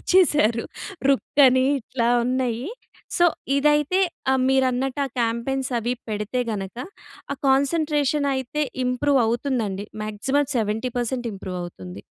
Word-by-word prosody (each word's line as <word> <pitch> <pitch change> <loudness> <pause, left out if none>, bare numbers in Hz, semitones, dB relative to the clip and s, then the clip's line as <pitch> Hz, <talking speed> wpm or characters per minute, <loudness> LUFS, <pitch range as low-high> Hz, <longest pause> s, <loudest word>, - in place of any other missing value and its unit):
మార్చేసారు. 295 - +3 0.5
రుక్ 275 +1 +1
అని 255 0 +4 0.2
ఇట్లా 235 0 -1 0.2
ఉన్నాయి. 250 -1 -1 0.5
సో, 350 - +4 0.3
ఇదైతే 295 +5 +3 0.3
ఆహ్, 265 - +2
మీరన్నట్టు 265 0 +1
ఆ - - -7
క్యాంపెయిన్స్ 240 +4 -1
అవి 240 +2 -1
పెడితే 210 +3 -2
గనక, 195 -1 -5 0.6
ఆ - - -17
కాన్సంట్రేషన్ 290 +1 +2
అయితే 265 +3 -2 0.2
ఇంప్రూవ్ 260 +2 +2
అవుతుందండి. 225 -5 -1 0.2
మాక్సిమం 265 +7 0
70% 240 +3 -1
ఇంప్రూవ్ 185 -1 -6
అవుతుంది. 95 - -9
255 Hz, 115 wpm, -23 LUFS, 225-280 Hz, 0.6 s, అని